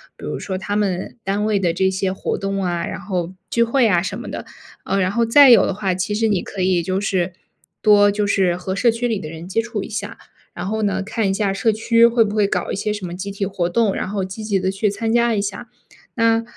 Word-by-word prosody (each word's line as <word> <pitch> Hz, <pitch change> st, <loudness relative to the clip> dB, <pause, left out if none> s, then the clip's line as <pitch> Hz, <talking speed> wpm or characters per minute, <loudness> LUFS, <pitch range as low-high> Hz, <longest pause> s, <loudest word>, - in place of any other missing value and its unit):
比 -, -, -16 dB
如 -, -, -4 dB
说 190 Hz, -2 st, -4 dB
他 205 Hz, +2 st, -3 dB
们 190 Hz, -2 st, -2 dB
单 200 Hz, +2 st, 0 dB
位 210 Hz, -1 st, +1 dB
的 175 Hz, -3 st, +1 dB
这 190 Hz, +2 st, +2 dB
些 190 Hz, 0 st, -1 dB
活 190 Hz, -, -3 dB
动 195 Hz, 0 st, -2 dB
啊， 175 Hz, -1 st, -1 dB
然 -, -, -6 dB
后 180 Hz, -2 st, -3 dB, 0.2 s
聚 235 Hz, -, +2 dB
会 245 Hz, +2 st, +2 dB
啊 180 Hz, -6 st, +3 dB
什 190 Hz, +2 st, -4 dB
么 -, -, -7 dB
的？ -, -, -6 dB, 0.4 s
啊， 195 Hz, -, -1 dB
然 185 Hz, -1 st, +1 dB
后 230 Hz, +3 st, +1 dB
再 275 Hz, +4 st, +7 dB
有 235 Hz, -, +7 dB
的 -, -, -1 dB
话， 195 Hz, -1 st, -1 dB
其 185 Hz, +3 st, -2 dB
实 225 Hz, +1 st, +1 dB
你 200 Hz, -4 st, +1 dB
可 195 Hz, -, -6 dB
以 185 Hz, -1 st, +2 dB
就 185 Hz, +3 st, -2 dB
是 185 Hz, -3 st, -1 dB, 0.5 s
多 205 Hz, -1 st, +6 dB
就 205 Hz, 0 st, -1 dB
是 190 Hz, -3 st, +2 dB
和 190 Hz, +1 st, -4 dB
社 235 Hz, +5 st, +3 dB
区 230 Hz, +2 st, -2 dB
里 220 Hz, -3 st, -1 dB
的 155 Hz, -, -7 dB
人 165 Hz, +1 st, -8 dB
接 210 Hz, +4 st, 0 dB
触 225 Hz, -3 st, -4 dB
一 -, -, -8 dB
下， 215 Hz, 0 st, -5 dB, 0.4 s
然 175 Hz, -, -6 dB
后 220 Hz, +2 st, -2 dB
呢， 195 Hz, -2 st, 0 dB
看 220 Hz, 0 st, -1 dB
一 -, -, +1 dB
下 200 Hz, 0 st, 0 dB
社 200 Hz, +3 st, +1 dB
区 230 Hz, +2 st, +4 dB
会 235 Hz, 0 st, +3 dB
不 205 Hz, -, -4 dB
会 210 Hz, -1 st, +3 dB
搞 180 Hz, -3 st, -2 dB
一 -, -, -2 dB
些 210 Hz, +2 st, -2 dB
什 205 Hz, -3 st, -5 dB
么 175 Hz, -, -6 dB
集 195 Hz, +2 st, -5 dB
体 200 Hz, 0 st, -3 dB
活 185 Hz, -3 st, -1 dB
动， 215 Hz, +1 st, +2 dB
然 -, -, -3 dB
后 200 Hz, -1 st, -2 dB
积 190 Hz, +4 st, -7 dB
极 200 Hz, -3 st, +1 dB
地 190 Hz, -, 0 dB
去 195 Hz, +2 st, 0 dB
参 225 Hz, +3 st, -2 dB
加 235 Hz, 0 st, +3 dB
一 200 Hz, -, 0 dB
下。 200 Hz, +3 st, -5 dB, 0.5 s
那 230 Hz, -1 st, +2 dB
200 Hz, 285 characters per minute, -20 LUFS, 190-220 Hz, 0.5 s, 再